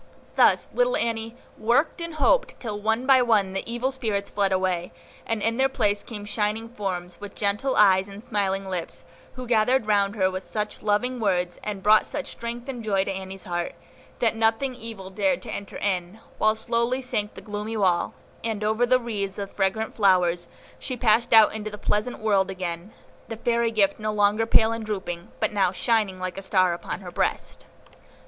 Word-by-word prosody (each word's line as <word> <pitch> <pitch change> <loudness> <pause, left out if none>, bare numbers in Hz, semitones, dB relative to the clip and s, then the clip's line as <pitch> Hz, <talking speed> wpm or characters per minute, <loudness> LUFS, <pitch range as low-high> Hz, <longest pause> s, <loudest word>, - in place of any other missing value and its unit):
Thus - - +4
little - - +2
Annie 225 0 -2 0.2
worked 260 +10 +2
and 335 -1 -4
hoped, - - +2
till 210 -4 -5
one 225 +4 0
by 265 -1 +6
one 210 -6 +2
the 195 - -2
evil 245 +3 -1
spirits 215 -6 -2
fled 200 -1 +1
away, 185 -2 0 0.4
and 225 -2 -1
in 230 +1 +1
their 265 0 +3
place 205 -6 +1
came 210 -3 -7
shining 210 +2 -1
forms, 185 -5 -5
with 205 -1 -8
gentle 210 +6 0
eyes 190 -2 +5
and 200 +3 -11
smiling 195 -4 -1
lips, 180 -3 -5 0.3
who 255 -1 -7
gathered 240 +1 +2
round 205 -1 +2
her 190 -3 +2
with 185 0 -5
such 210 +1 -4
loving 240 +5 0
words, 180 -4 0
and 205 -2 -4
brought 215 +1 +5
such 290 - -4
strength 235 +2 -6
and 250 -4 -5
joy 195 -3 +1
to 195 - -3
Annie's 190 0 -6
heart, 175 -1 -3 0.4
that 230 -2 +1
nothing 225 +4 +1
evil 225 -6 -8
dared 265 +8 0
to - - -6
enter 200 - -6
in; 185 0 -2 0.2
while 215 0 +3
slowly 235 +3 0
sank 210 -4 -2
the - - -8
gloomy 210 +2 -4
wall, 180 -4 +1 0.3
and, 220 -2 -2
over 220 +3 +2
wreaths 205 -5 -4
of 200 -1 -5
fragrant 215 +3 -1
flowers, 180 -4 +3 0.3
she 255 -2 -4
passed 230 0 +3
out 220 -2 +7
into 215 -1 -4
the 210 - -8
pleasant 210 +4 -1
world 200 -3 +2
again, 180 0 -5 0.4
the 225 - -6
fairy 235 0 +1
gift 205 -3 +2
no 215 0 -1
longer 210 +2 +2
pale 225 0 +4
and 230 0 -3
drooping, 190 -4 -5
but - - 0
now 195 -3 +2
shining 210 -1 +1
like 185 +1 -4
a - - -7
star 185 -2 +2
upon 170 +2 -5
her 180 -2 -8
breast. - - -2
210 Hz, 190 wpm, -25 LUFS, 195-230 Hz, 0.4 s, out